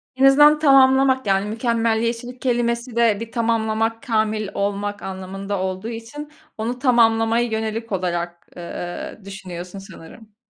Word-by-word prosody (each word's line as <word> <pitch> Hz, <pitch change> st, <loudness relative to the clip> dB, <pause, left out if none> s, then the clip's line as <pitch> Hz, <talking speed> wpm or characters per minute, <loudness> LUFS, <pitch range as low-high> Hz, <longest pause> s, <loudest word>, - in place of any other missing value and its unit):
En 265 Hz, +1 st, +3 dB
azından 295 Hz, +2 st, +6 dB
tamamlamak, 265 Hz, -3 st, +4 dB
yani, 195 Hz, 0 st, +2 dB
mükemmeliyetçilik 230 Hz, +1 st, -1 dB
kelimesi 235 Hz, -1 st, -1 dB
de 230 Hz, -3 st, +3 dB
bir 230 Hz, 0 st, -7 dB
tamamlamak, 225 Hz, -1 st, 0 dB
kâmil 215 Hz, -4 st, 0 dB
olmak 205 Hz, 0 st, -2 dB
anlamında 195 Hz, +1 st, -5 dB
olduğu 190 Hz, +3 st, -3 dB
için 240 Hz, +7 st, -8 dB, 0.3 s
onu 235 Hz, +3 st, -3 dB
tamamlamaya 230 Hz, -2 st, +3 dB
yönelik 220 Hz, 0 st, -3 dB
olarak, 175 Hz, -2 st, -3 dB
eee, 175 Hz, +2 st, -7 dB
düşünüyorsun 185 Hz, -1 st, -8 dB
sanırım. 195 Hz, +3 st, -14 dB
225 Hz, 120 wpm, -21 LUFS, 200-240 Hz, 0.3 s, azından